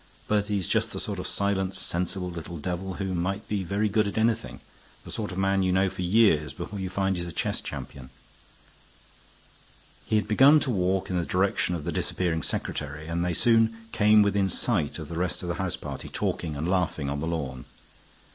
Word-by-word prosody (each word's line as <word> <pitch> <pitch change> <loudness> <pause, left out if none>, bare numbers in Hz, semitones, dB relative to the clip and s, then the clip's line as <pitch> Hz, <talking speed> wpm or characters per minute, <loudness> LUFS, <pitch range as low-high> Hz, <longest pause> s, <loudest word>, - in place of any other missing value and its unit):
But 105 -1 +1
he's 100 -4 -1
just - - 0
the - - -4
sort - - -4
of - - -4
silent, 95 -1 0
sensible 90 +1 -2
little 85 0 -6
devil 90 +4 -3
who 95 0 -2
might 90 +3 -2
be 100 -2 -1
very 100 +4 0
good 105 +1 +2
at 100 - -4
anything; 115 0 0 0.4
the - - -8
sort 105 -3 -3
of 90 - -6
man 95 0 +2
you 95 -1 +2
know 95 0 +2
for - - -6
years 90 -6 +3
before 100 - -6
you 95 -1 -3
find 95 +1 0
he's 85 -1 -3
a - - -5
chess - - -1
champion." 65 -1 -7 1.9
He - - -1
had 105 -1 +2
begun 135 +8 +7
to 130 - 0
walk 95 -2 0
in 90 - 0
the - - 0
direction 90 0 +1
of 80 - -5
the - - -2
disappearing 85 -3 -1
secretary, 75 +1 -3
and 85 +2 -1
they 90 -1 0
soon 115 0 +3
came 105 0 +5
within 100 -1 +2
sight 90 -8 0
of 80 -3 -6
the 80 - -6
rest 90 0 -1
of 90 - -3
the 85 - -1
house 95 -3 -1
party - - -7
talking 80 -3 -2
and 75 +4 -2
laughing 90 -6 0
on 70 +1 -2
the 80 - -2
lawn. 70 -7 -3
95 Hz, 205 wpm, -27 LUFS, 85-100 Hz, 1.9 s, begun